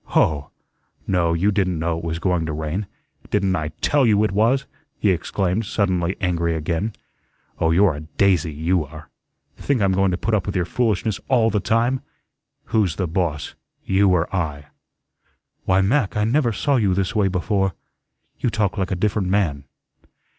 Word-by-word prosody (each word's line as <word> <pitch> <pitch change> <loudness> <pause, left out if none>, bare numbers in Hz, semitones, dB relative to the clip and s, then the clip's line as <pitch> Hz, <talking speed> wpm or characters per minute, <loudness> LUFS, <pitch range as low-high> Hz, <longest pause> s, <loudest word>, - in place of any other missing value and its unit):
"Hoh! 70 -2 +1 0.6
no, 85 -3 +1
you 95 +5 +2
didn't 95 -4 0
know 80 +1 -1
it 80 - -6
was 85 -1 -2
going 85 -2 0
to 75 - -3
rain. 80 +6 -3 0.4
Didn't 95 -3 +1
I 80 -3 -2
TELL 145 -4 +3
you 105 -1 +4
it 110 - +1
was?" 115 +7 +2 0.3
he 100 - +2
exclaimed, 95 +4 -1
suddenly 95 -4 0
angry 85 -2 0
again. 85 +7 -2 0.7
"Oh, 80 - +2
you're 90 +1 +4
a 75 - -6
DAISY, 85 +1 +1
you 80 +3 0
are. 75 +2 -12 0.5
Think 140 -3 0
I'm 100 -2 +2
going 95 +1 +2
to 90 - -1
put 110 +4 -2
up 105 -2 +1
with 100 - -3
your 90 -2 +1
foolishness 110 +1 0
ALL 115 -4 +3
the 105 - +1
time? 120 +6 +1 0.6
Who's 100 -8 +1
the 95 - -1
boss, 80 -4 -2 0.3
you 95 +1 +3
or 90 -2 +2
I?" 75 -5 -3 1.0
"Why, 95 +1 +3
Mac, 105 +1 +1
I 105 - +2
never 120 +2 +2
saw 135 +6 +1
you 100 -6 +2
this 95 +2 -1
way 105 -2 +3
before. 95 0 0 0.6
You - - +1
talk 105 -4 -1
like 95 -1 -1
a 95 - -1
different 100 +1 0
man." 85 -8 0
95 Hz, 175 wpm, -22 LUFS, 85-105 Hz, 1.0 s, you